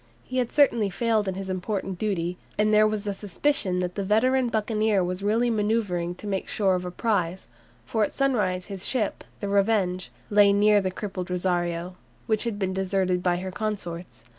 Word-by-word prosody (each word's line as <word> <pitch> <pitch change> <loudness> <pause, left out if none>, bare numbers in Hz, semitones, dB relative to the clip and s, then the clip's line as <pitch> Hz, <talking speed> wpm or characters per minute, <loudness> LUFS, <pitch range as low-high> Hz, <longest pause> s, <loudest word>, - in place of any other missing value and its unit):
He 255 0 -2
had 245 -2 -1
certainly 240 -8 +3
failed 220 +1 0
in 190 - -2
his 195 0 -5
important 190 0 -3
duty, 180 -4 -2 0.2
and 215 0 +2
there 215 0 +6
was 215 -1 -2
a 205 - -1
suspicion 200 0 +1
that 180 -1 -2
the 200 - -3
veteran 245 +5 +2
buccaneer 215 -2 +1
was 180 +1 -3
really 225 +4 +2
manoeuvring 205 -5 0
to 195 - -11
make 195 -2 -2
sure 195 -3 +1
of 180 0 -1
a - - -3
prize, 180 - -1 0.4
for 220 - 0
at - - -1
sunrise 205 -10 0
his 195 -2 -4
ship, 235 -6 -1 0.2
the 200 - -2
"Revenge," 200 -2 +1 0.2
lay 205 -1 +6
near 205 0 +4
the 190 - -1
crippled 185 -1 -5
"Rosario," 175 -1 -1 0.3
which 220 +1 0
had 230 -3 -2
been 190 -2 -1
deserted 190 -1 0
by 180 -1 +1
her 185 +1 -5
consorts. 185 -4 -5
200 Hz, 190 wpm, -26 LUFS, 180-215 Hz, 0.4 s, there